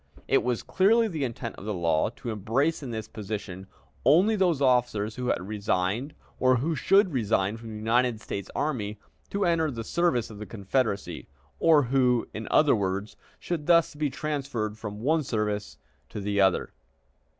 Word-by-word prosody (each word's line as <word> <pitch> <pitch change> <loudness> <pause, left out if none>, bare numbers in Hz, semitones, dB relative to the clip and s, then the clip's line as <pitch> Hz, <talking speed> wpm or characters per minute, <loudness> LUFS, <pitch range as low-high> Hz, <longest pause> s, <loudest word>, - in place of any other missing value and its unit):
It - - +3
was 125 -2 -1
clearly 225 +4 +3
the 160 -8 -3
intent 115 -2 -4
of - - -10
the 105 -1 -2
law 85 -1 +1
to 120 - -5
embrace 120 - 0
in 135 - -6
this 110 -2 -5
provision 100 -3 -6 0.4
only 195 +8 +5
those 180 -7 +2
officers 120 -5 +1
who 125 -1 -4
had 95 - -1
resigned 105 +5 -1 0.2
or 130 0 +4
who 145 +7 0
should 195 +2 +3
resign 105 -4 +1
from 115 0 -9
the 110 - -7
United 115 +2 +1
States 100 -2 -6
Army 110 -9 -2 0.3
to 200 -1 0
enter 165 -2 +2
the 115 -4 -5
service 125 -5 0
of 105 - -10
the 105 - -7
Confederacy, 100 +1 -2 0.3
or 155 -3 +5
who, 125 -1 +2
in 110 0 -6
other 150 -4 +5
words, 100 0 -2 0.2
should 165 -4 -4
thus 170 -2 +4
be 150 0 -1
transferred 135 -7 -3
from 105 -1 -7
one 155 +6 +2
service 105 -5 -2 0.3
to - - -6
the 100 0 0
other. 95 -2 +2
120 Hz, 175 wpm, -27 LUFS, 105-150 Hz, 0.4 s, only